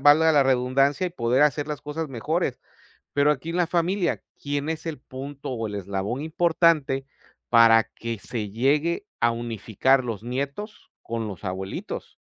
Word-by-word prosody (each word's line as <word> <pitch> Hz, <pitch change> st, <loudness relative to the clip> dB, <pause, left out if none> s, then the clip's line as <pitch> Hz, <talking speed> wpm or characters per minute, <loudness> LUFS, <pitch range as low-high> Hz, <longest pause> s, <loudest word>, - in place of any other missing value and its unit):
valga 155 Hz, +3 st, +6 dB
la 145 Hz, -, +6 dB
redundancia, 135 Hz, +5 st, +2 dB
y -, -, -4 dB
poder 125 Hz, -3 st, +2 dB
hacer 150 Hz, 0 st, +2 dB
las 150 Hz, -2 st, -4 dB
cosas 150 Hz, +1 st, -4 dB
mejores. 135 Hz, +2 st, -1 dB, 0.5 s
Pero 145 Hz, +1 st, +4 dB
aquí 150 Hz, +2 st, -2 dB
en 170 Hz, -, -2 dB
la 175 Hz, -, +3 dB
familia, 175 Hz, +2 st, 0 dB, 0.2 s
¿quién 145 Hz, +1 st, -2 dB
es 160 Hz, 0 st, -3 dB
el 155 Hz, -5 st, -3 dB
punto 135 Hz, +2 st, -7 dB
o 115 Hz, -3 st, -2 dB
el 105 Hz, -, -5 dB
eslabón 100 Hz, +6 st, -3 dB
importante 160 Hz, -4 st, +2 dB, 0.4 s
para 115 Hz, -1 st, +7 dB
que 115 Hz, 0 st, -6 dB
se 110 Hz, -4 st, -5 dB
llegue 150 Hz, -, +1 dB
a 120 Hz, -, +4 dB
unificar 120 Hz, +3 st, +1 dB
los 115 Hz, -3 st, -4 dB
nietos 140 Hz, -, -5 dB
con 115 Hz, -1 st, -3 dB
los 100 Hz, -1 st, -8 dB
abuelitos 95 Hz, +1 st, -5 dB
135 Hz, 160 wpm, -25 LUFS, 115-155 Hz, 0.5 s, para